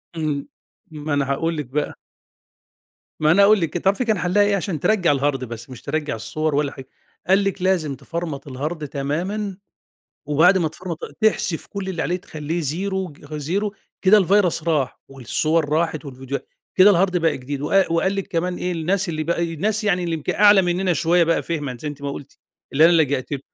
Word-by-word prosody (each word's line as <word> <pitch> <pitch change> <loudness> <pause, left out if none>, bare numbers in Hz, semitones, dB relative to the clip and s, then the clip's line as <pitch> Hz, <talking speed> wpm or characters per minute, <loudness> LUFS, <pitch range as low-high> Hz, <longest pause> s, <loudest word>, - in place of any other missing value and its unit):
إمم، 155 -3 -2 0.4
ما 155 -1 -4
أنا 140 -1 0
هاقول 165 +4 -1
لِك 150 - -3
بقى. 145 +4 -2 1.3
ما 155 0 +4
أنا 200 +4 +6
أقول 210 +1 +6
لِك 165 - -1
تعرفي 195 +7 +1
كان 220 -3 +1
حلّها 180 +4 +3
إيه 205 0 +2
عشان 185 -4 -2
ترجّع 185 -1 +3
الهارد 140 -1 0
بس 115 0 -8
مش 125 -2 -10
ترجّع 150 -2 -2
الصور 155 +7 -2
ولا 145 -1 +1
حاجة، 130 -1 -11 0.4
قال 195 +2 +4
لِك 195 -1 -2
لازم 175 -7 +1
تفرمت 160 -3 -5
الهارد 150 +4 -4
تمامًا 180 +9 -3 0.7
وبعد 165 +6 +5
ما 165 -3 +1
تفرمت 170 +1 -7
ال - - -7
تحذف 215 -6 +1
كُلّ 200 -2 -5
اللي 175 -4 -2
عليه 175 - 0
تخلّيه 160 -1 -4
زيرو 185 +4 -2 0.2
زيرو 185 +8 -2 0.3
كده 200 +3 +7
الفيرس 190 -3 +2
راح، 155 -5 0
والصور 145 +4 0
راحت 155 0 0
والفيديوهات، 135 0 -6 0.3
كده 195 +2 +7
الهارد 185 -1 +2
بقى 165 -3 +1
جديد 135 +2 -5
وق 190 +3 +2
وقال 190 +4 +1
لِك 195 -1 -3
كمان 180 +1 -1
إيه، 180 0 -2
الناس 180 +3 -1
اللي 155 -2 -2
بقى 170 +1 0
الناس 215 +6 -1
يعني 180 -3 +1
اللي 170 -1 -1
يمكن 155 -3 -3
أعلى 205 -1 +6
مننا 180 +1 +1
شوية 170 +2 +3
بقى 165 0 +1
فهمًا 145 -6 -3
زي 155 - -4
أنتِ 145 -1 -8
ما 140 - -2
قُلتِ، 140 0 -10 0.3
اللي 150 +4 +5
أنا 170 - +7
لجأت 145 -5 +1
لهم 140 - -2
165 Hz, 190 wpm, -22 LUFS, 145-190 Hz, 1.3 s, كده